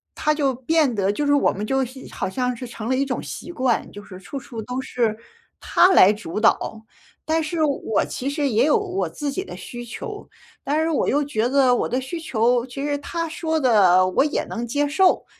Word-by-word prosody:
他 305 Hz, -, +1 dB
就 280 Hz, -3 st, +1 dB
变 275 Hz, +2 st, +1 dB
得 195 Hz, -1 st, +1 dB
就 290 Hz, +8 st, -2 dB
是 285 Hz, -, +3 dB
我 285 Hz, -, +3 dB
们 205 Hz, +2 st, -4 dB
就 270 Hz, +3 st, +1 dB
是 260 Hz, +1 st, -9 dB
好 -, -, -3 dB
像 250 Hz, +3 st, -1 dB
是 250 Hz, +2 st, -7 dB
成 230 Hz, -1 st, -7 dB
了 260 Hz, -, +1 dB
一 275 Hz, -, +1 dB
种 265 Hz, -, -3 dB
习 345 Hz, -, -7 dB
惯， 255 Hz, -7 st, 0 dB
就 205 Hz, 0 st, -10 dB
是 185 Hz, -2 st, -11 dB
处 270 Hz, +9 st, -7 dB
处 235 Hz, -3 st, -8 dB
都 250 Hz, +4 st, -4 dB
是 225 Hz, -4 st, -1 dB, 0.4 s
他 365 Hz, -, +4 dB
来 205 Hz, -, +7 dB
主 210 Hz, -3 st, -5 dB
导， 220 Hz, 0 st, +1 dB, 0.4 s
但 320 Hz, +1 st, +1 dB
是 315 Hz, +1 st, -1 dB
我 275 Hz, -7 st, 0 dB
其 270 Hz, +2 st, -4 dB
实 285 Hz, 0 st, -1 dB
也 230 Hz, +3 st, +3 dB
有 305 Hz, -, +4 dB
我 390 Hz, -2 st, -2 dB
自 290 Hz, -2 st, -4 dB
己 380 Hz, -, -3 dB
的 -, -, -9 dB
需 240 Hz, -4 st, -8 dB
求， 235 Hz, -, -8 dB, 0.3 s
但 300 Hz, +3 st, 0 dB
是 320 Hz, -, +1 dB
我 305 Hz, -, +1 dB
又 290 Hz, +2 st, +2 dB
觉 240 Hz, -4 st, -1 dB
得 260 Hz, -2 st, +4 dB
我 -, -, -1 dB
的 250 Hz, -, 0 dB
需 265 Hz, +6 st, -5 dB
求， 245 Hz, -4 st, +1 dB
其 270 Hz, +2 st, -6 dB
实 290 Hz, -1 st, 0 dB
他 335 Hz, +3 st, -3 dB
说 320 Hz, 0 st, -2 dB
的 190 Hz, -8 st, +5 dB
我 185 Hz, +8 st, +2 dB
也 300 Hz, -, -1 dB
能 235 Hz, +1 st, -4 dB
接 290 Hz, +4 st, 0 dB
受， 370 Hz, +6 st, +3 dB
260 Hz, 240 characters per minute, -22 LUFS, 230-295 Hz, 0.4 s, 来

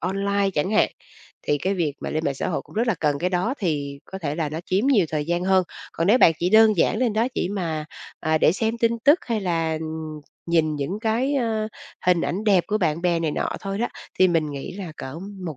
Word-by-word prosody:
online 195 Hz, +2 st, 0 dB
chẳng 150 Hz, +7 st, 0 dB
hạn, 215 Hz, -, +4 dB, 0.5 s
thì 145 Hz, -, 0 dB
cái 190 Hz, +6 st, -1 dB
việc 160 Hz, -6 st, 0 dB
mà -, -, -4 dB
lên 155 Hz, +1 st, -2 dB
mạng 140 Hz, -, 0 dB
xã -, -, -3 dB
hội -, -, -2 dB
cũng -, -, -18 dB
rất 230 Hz, +3 st, +1 dB
là 225 Hz, -, +3 dB
cần, 145 Hz, -2 st, +1 dB
cái 180 Hz, +3 st, -1 dB
đó 185 Hz, +9 st, 0 dB
thì 145 Hz, -6 st, -2 dB
có 190 Hz, -, -8 dB
thể 150 Hz, -4 st, -3 dB
là 160 Hz, -2 st, -1 dB
nó 155 Hz, +2 st, -4 dB
chiếm 200 Hz, +8 st, +1 dB
nhiều 210 Hz, -12 st, +4 dB
thời 150 Hz, -2 st, -2 dB
gian 175 Hz, +1 st, 0 dB
hơn. 190 Hz, -1 st, +3 dB, 0.3 s
Còn 165 Hz, -, -1 dB
nếu 230 Hz, +6 st, +5 dB
bạn 165 Hz, -, +7 dB
chỉ 175 Hz, +1 st, 0 dB
đơn 220 Hz, 0 st, +6 dB
giản 215 Hz, +6 st, +2 dB
lên 245 Hz, -4 st, +1 dB
đó 225 Hz, +2 st, +1 dB
chỉ 180 Hz, -, -1 dB
mà, 165 Hz, -6 st, -3 dB, 0.4 s
à, 155 Hz, 0 st, +1 dB
để 155 Hz, -, +4 dB
xem 225 Hz, +4 st, -1 dB
tin 230 Hz, 0 st, +1 dB
tức 295 Hz, +5 st, +6 dB
hay 230 Hz, -3 st, -1 dB
là 165 Hz, -4 st, 0 dB, 0.7 s
nhìn 160 Hz, -2 st, +2 dB
những 165 Hz, +9 st, -3 dB
cái, 240 Hz, +5 st, 0 dB
ơ, 220 Hz, -4 st, 0 dB, 0.4 s
hình 180 Hz, -2 st, +4 dB
ảnh 200 Hz, +5 st, -2 dB
đẹp 195 Hz, -5 st, +4 dB
của 215 Hz, -, 0 dB
bạn 165 Hz, -3 st, 0 dB
bè 175 Hz, -2 st, +2 dB
này 160 Hz, -2 st, 0 dB
nọ -, -, -1 dB
thôi 195 Hz, 0 st, -4 dB
đó, 235 Hz, -, 0 dB, 0.3 s
thì 185 Hz, -, +6 dB
mình 165 Hz, -3 st, +1 dB
nghĩ 140 Hz, +3 st, -6 dB
là 180 Hz, -5 st, -6 dB
cỡ 130 Hz, +5 st, -7 dB, 0.3 s
1 155 Hz, -5 st, -5 dB
180 Hz, 245 wpm, -23 LUFS, 160-215 Hz, 0.7 s, bạn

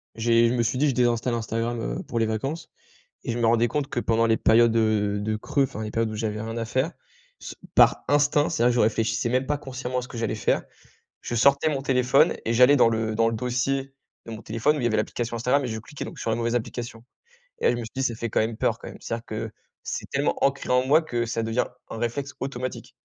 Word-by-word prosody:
j'ai 115 Hz, +1 st, +3 dB
je 120 Hz, -, 0 dB
me 120 Hz, -, +1 dB
suis 115 Hz, +2 st, 0 dB
dit: 145 Hz, +2 st, +3 dB
«Je -, -, 0 dB
désinstalle 120 Hz, 0 st, +1 dB
Instagram, 115 Hz, +1 st, -2 dB, 0.2 s
heu, -, -, -6 dB
pour 115 Hz, -, -3 dB
les 115 Hz, -, +2 dB
vacances». 135 Hz, +9 st, -3 dB, 0.6 s
Et -, -, -1 dB
je 115 Hz, -, -3 dB
me 120 Hz, -, +1 dB
rendais 115 Hz, +1 st, +3 dB
compte 140 Hz, +3 st, -2 dB
que -, -, -2 dB
pendant 115 Hz, -1 st, +2 dB
les 115 Hz, -1 st, +3 dB
périodes, 115 Hz, 0 st, +4 dB
heu, 105 Hz, -2 st, +1 dB
de 110 Hz, +1 st, -1 dB
creux, 140 Hz, +6 st, 0 dB
enfin 110 Hz, -4 st, -4 dB
les 105 Hz, -, -5 dB
périodes 115 Hz, 0 st, 0 dB
où 110 Hz, -, -5 dB
j'avais 105 Hz, -1 st, -3 dB
rien 115 Hz, +1 st, -5 dB
à 115 Hz, -, -2 dB
faire, 130 Hz, +9 st, -1 dB, 0.5 s
s -, -, -8 dB, 0.2 s
par -, -, +5 dB
instinct, 145 Hz, 0 st, +3 dB
c'est 115 Hz, -, 0 dB
vrai 120 Hz, -, +5 dB
que 120 Hz, -, -2 dB
je -, -, +2 dB
réfléchissais 115 Hz, +2 st, +1 dB
même 130 Hz, +2 st, +1 dB
pas 150 Hz, +2 st, -1 dB
consciemment 125 Hz, -2 st, -4 dB
à -, -, -4 dB
ce 125 Hz, -, -8 dB
que 120 Hz, -, -9 dB
j'allais 115 Hz, -1 st, -1 dB
faire. 105 Hz, -, 0 dB, 0.6 s
Je -, -, -4 dB
sortais 140 Hz, +5 st, +4 dB
mon 140 Hz, -3 st, -2 dB
téléphone 130 Hz, -1 st, +3 dB
et 115 Hz, -, 0 dB
j'allais 125 Hz, +4 st, +6 dB
dans 125 Hz, -, +5 dB
le 110 Hz, -1 st, -1 dB
dans 115 Hz, +1 st, +3 dB
le 115 Hz, -, -2 dB
dossier 135 Hz, +3 st, -1 dB, 0.3 s
de -, -, -8 dB
mon 110 Hz, 0 st, -8 dB
téléphone 115 Hz, +8 st, 0 dB
où -, -, -2 dB
il -, -, -4 dB
y -, -, +3 dB
avait 110 Hz, -, +1 dB
l'application 115 Hz, +2 st, -2 dB
Instagram 125 Hz, +5 st, +1 dB
et 125 Hz, -, -2 dB
je 110 Hz, -, -4 dB
cliquais 125 Hz, +6 st, -8 dB
donc, -, -, -9 dB
sur -, -, -2 dB
la 110 Hz, -, +1 dB
mauvaise 115 Hz, 0 st, -1 dB
application 120 Hz, 0 st, -5 dB, 0.6 s
et -, -, 0 dB
là, -, -, +5 dB
je 120 Hz, -, -1 dB
me -, -, -4 dB
suis 110 Hz, -, -9 dB
dit: 135 Hz, -, -1 dB
«Ça 120 Hz, -3 st, 0 dB
fait 115 Hz, 0 st, -4 dB
quand -, -, +1 dB
même 110 Hz, +1 st, 0 dB
peur -, -, 0 dB
quand -, -, -10 dB
même». -, -, -9 dB
C'est-à-dire 115 Hz, 0 st, -5 dB
que 110 Hz, 0 st, -5 dB, 0.3 s
c'est -, -, -5 dB
tellement -, -, 0 dB
ancré 140 Hz, 0 st, -1 dB
en 125 Hz, 0 st, +3 dB
moi 155 Hz, +4 st, +5 dB
que 120 Hz, -7 st, -2 dB
ça 115 Hz, 0 st, -2 dB
devient 115 Hz, +2 st, 0 dB, 0.2 s
un -, -, -6 dB
réflexe 135 Hz, +5 st, -3 dB
automatique. 130 Hz, -1 st, -5 dB
120 Hz, 265 wpm, -25 LUFS, 115-130 Hz, 0.6 s, j'allais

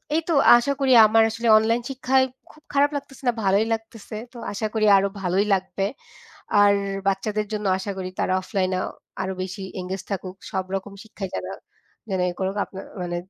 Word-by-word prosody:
এই 325 Hz, -, +2 dB
তো -, -, +3 dB, 0.2 s
আশা 240 Hz, +4 st, 0 dB
করি 270 Hz, -1 st, +2 dB, 0.2 s
আমার 225 Hz, +1 st, +5 dB
আসলে 230 Hz, +1 st, -3 dB
অনলাইন 225 Hz, +2 st, +2 dB
শিক্ষায় 265 Hz, 0 st, +2 dB, 0.3 s
খুব 305 Hz, -, -21 dB
খারাপ 285 Hz, +1 st, +4 dB
লাগতেছে 275 Hz, -1 st, -7 dB
না, 245 Hz, -, +4 dB
ভালোই 200 Hz, +2 st, +3 dB
লাগতেছে। 225 Hz, -1 st, -7 dB, 0.2 s
তো -, -, -11 dB
আশা 205 Hz, +2 st, -3 dB
করি 220 Hz, -1 st, +1 dB
আরো 195 Hz, +1 st, +2 dB
ভালোই 190 Hz, +2 st, +1 dB
লাগবে। 195 Hz, +1 st, -1 dB, 0.8 s
আর 205 Hz, 0 st, +6 dB, 0.3 s
বাচ্চাদের 210 Hz, +2 st, 0 dB
জন্য 210 Hz, -1 st, -2 dB
আশা 195 Hz, +2 st, -5 dB
করি 185 Hz, -1 st, -4 dB
তারা -, -, 0 dB
অফলাইনে 185 Hz, -1 st, -1 dB, 0.5 s
আরো 190 Hz, 0 st, -2 dB
বেশি 190 Hz, +2 st, -6 dB, 0.2 s
এনগেজ 185 Hz, +1 st, -5 dB
থাকুক, 185 Hz, -2 st, -4 dB, 0.2 s
সবরকম 190 Hz, +1 st, -3 dB
শিক্ষায় 200 Hz, -3 st, -7 dB
যারা -, -, -4 dB, 0.6 s
যেন 190 Hz, -2 st, -1 dB
ই -, -, -5 dB
করুক 190 Hz, +1 st, -2 dB
আপনার 195 Hz, -, -9 dB, 0.2 s
মানে 175 Hz, -1 st, -3 dB
205 Hz, 175 wpm, -24 LUFS, 190-230 Hz, 0.8 s, আর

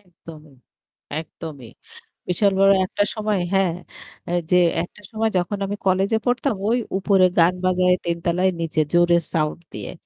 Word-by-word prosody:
একদমই, 165 Hz, -5 st, -15 dB, 0.7 s
একদমিই 150 Hz, -6 st, -10 dB, 0.6 s
বিশাল 200 Hz, +3 st, +2 dB
বড় 195 Hz, 0 st, +6 dB
একটা 205 Hz, -, 0 dB
সময় 215 Hz, -2 st, -1 dB
হ্যাঁ 195 Hz, -3 st, +2 dB, 0.6 s
এহ 175 Hz, 0 st, +1 dB
যে 180 Hz, -, +5 dB, 0.3 s
একটা 180 Hz, -, -12 dB
সময় 220 Hz, 0 st, 0 dB
যখন 180 Hz, +3 st, -1 dB
আমি 200 Hz, +1 st, -3 dB
কলেজে 195 Hz, +3 st, +2 dB
পড়তাম 245 Hz, -2 st, 0 dB
ওই 235 Hz, -, +2 dB, 0.2 s
উপরে 195 Hz, -1 st, +3 dB
গান 170 Hz, +2 st, +5 dB
বাজায়ে 180 Hz, 0 st, +3 dB
৩ 170 Hz, 0 st, -1 dB
তালায় 180 Hz, +2 st, +2 dB
নিচে 160 Hz, -1 st, 0 dB
জোরে 175 Hz, 0 st, +4 dB, 0.2 s
সাউন্ড 155 Hz, -1 st, -1 dB
দিয়ে। -, -, -6 dB
180 Hz, 150 wpm, -22 LUFS, 170-200 Hz, 0.7 s, বড়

